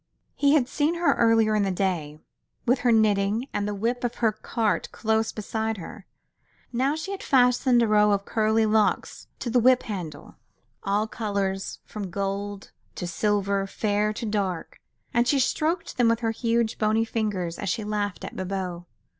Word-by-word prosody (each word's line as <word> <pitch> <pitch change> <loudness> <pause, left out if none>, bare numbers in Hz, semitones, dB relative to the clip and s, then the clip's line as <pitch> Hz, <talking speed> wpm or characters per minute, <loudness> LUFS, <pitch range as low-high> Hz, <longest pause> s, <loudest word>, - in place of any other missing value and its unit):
He 285 +1 +4
had 260 -5 +3
seen 300 +5 0
her 340 0 +3
earlier 225 -2 +3
in 210 - +2
the 195 - +1
day, 175 -6 -1 0.5
with 250 +1 +3
her 245 - +2
knitting 215 +2 +2
and 205 - -1
the 210 - -2
whip 235 +5 -1
of 245 0 -1
her 225 -2 +2
cart 215 0 -1
close 220 0 0
beside 220 +1 -3
her. 190 +3 -10 0.7
Now 265 +5 +1
she 320 +5 -5
had 395 - -5
fastened 250 -2 +4
a - - +2
row 210 0 +4
of 200 0 0
curly 220 0 +2
locks 215 0 +1
to 240 - -4
the 245 - +4
whip 255 +1 +4
handle, 175 -9 -7 0.4
all 205 +2 0
colours, 200 -3 -3
from 205 -3 -6
gold 200 +1 -4 0.2
to 180 - -4
silver, 200 +2 0
fair 210 +1 0
to 230 +2 -5
dark, 200 -5 -2 0.3
and 240 +1 +2
she 280 - +3
stroked 325 +6 0
them 240 -2 +4
with 230 +1 +1
her 225 -1 +1
huge, 230 -1 0
bony 220 +1 +2
fingers 205 -7 -2
as 200 - -2
she 220 +5 -1
laughed 205 -2 -3
at - - -8
Bibot. 185 -2 -4
215 Hz, 175 wpm, -25 LUFS, 200-235 Hz, 0.7 s, He